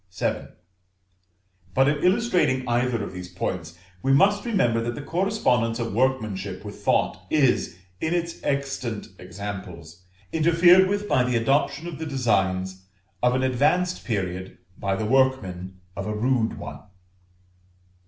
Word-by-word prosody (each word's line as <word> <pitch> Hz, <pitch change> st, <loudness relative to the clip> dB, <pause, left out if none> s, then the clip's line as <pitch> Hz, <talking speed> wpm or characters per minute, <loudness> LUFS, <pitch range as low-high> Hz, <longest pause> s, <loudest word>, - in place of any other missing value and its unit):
VII. -, -, -1 dB, 1.3 s
But 135 Hz, +1 st, +4 dB
in 145 Hz, 0 st, 0 dB
illustrating 180 Hz, -, +2 dB
either 120 Hz, -2 st, +1 dB
of 100 Hz, -, -6 dB
these 90 Hz, -1 st, -7 dB
points, 85 Hz, -2 st, -4 dB, 0.2 s
we 135 Hz, -, +1 dB
must 200 Hz, -, +4 dB
remember 120 Hz, -, +2 dB
that 120 Hz, +1 st, -3 dB
the -, -, -6 dB
correspondence 145 Hz, -, +1 dB
of 115 Hz, -3 st, -3 dB
workmanship 110 Hz, -6 st, -1 dB
with 105 Hz, -, -7 dB
thought -, -, +1 dB
is, 130 Hz, -, +2 dB, 0.2 s
in 160 Hz, +8 st, 0 dB
existent 140 Hz, -9 st, -3 dB
examples, 90 Hz, -3 st, -8 dB, 0.3 s
interfered 170 Hz, +3 st, +6 dB
with 205 Hz, +1 st, -1 dB
by 130 Hz, -, +3 dB
the 125 Hz, -1 st, 0 dB
adoption 140 Hz, +6 st, +1 dB
of 170 Hz, -3 st, -6 dB
the 160 Hz, -, -4 dB
designs 95 Hz, -8 st, 0 dB, 0.3 s
of 125 Hz, 0 st, +3 dB
an 130 Hz, -, +1 dB
advanced 150 Hz, +8 st, +1 dB
period 95 Hz, -4 st, -3 dB, 0.2 s
by 95 Hz, -1 st, -1 dB
the 110 Hz, -, -2 dB
workmen 100 Hz, -8 st, +1 dB, 0.2 s
of 100 Hz, +1 st, -4 dB
a 105 Hz, -, -2 dB
rude 115 Hz, 0 st, +1 dB
one. -, -, -7 dB
125 Hz, 135 wpm, -25 LUFS, 95-150 Hz, 1.3 s, interfered